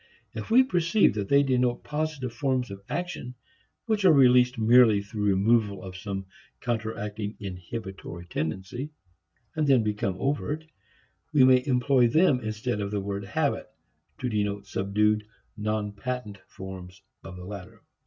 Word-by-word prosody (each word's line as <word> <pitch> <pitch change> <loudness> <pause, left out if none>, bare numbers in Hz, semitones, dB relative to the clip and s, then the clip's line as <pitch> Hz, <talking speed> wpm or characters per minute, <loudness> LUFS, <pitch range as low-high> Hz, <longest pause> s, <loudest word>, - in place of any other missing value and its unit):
If - - -6
we 245 +4 +7
perceive 180 - +3
that 100 -2 -3
they 140 0 +5
denote 125 -2 +1
positive 150 -5 -3
forms 130 -2 -1
of 100 0 -8
action 175 -8 -4 0.5
which 215 -3 0
are 185 - +7
released 125 -3 +5
merely 115 -2 +5
through 105 0 -4
removal 100 +1 +2
of 95 -1 -8
some 95 +1 -5 0.3
counteracting 110 -3 -3
"inhibitory" 95 -2 -7
tendency, 95 - -4 0.7
and 155 -2 +1
then 130 -5 +5
become 105 -3 -1
overt, 145 +4 -2 0.7
we 145 -4 +5
may 130 -1 +6
employ 125 -1 +3
them 145 +1 +4
instead 110 0 -3
of 100 - -2
the 105 0 -2
word 100 0 -4
habit 100 - -1 0.5
to 125 - -1
denote 105 -3 -1
subdued, 105 +2 +1 0.3
non 105 -1 -2
patent 105 -2 -5
forms 95 0 -10 0.2
of 90 - -9
the 90 0 -9
latter. 100 -2 -9
110 Hz, 145 wpm, -27 LUFS, 100-130 Hz, 0.7 s, we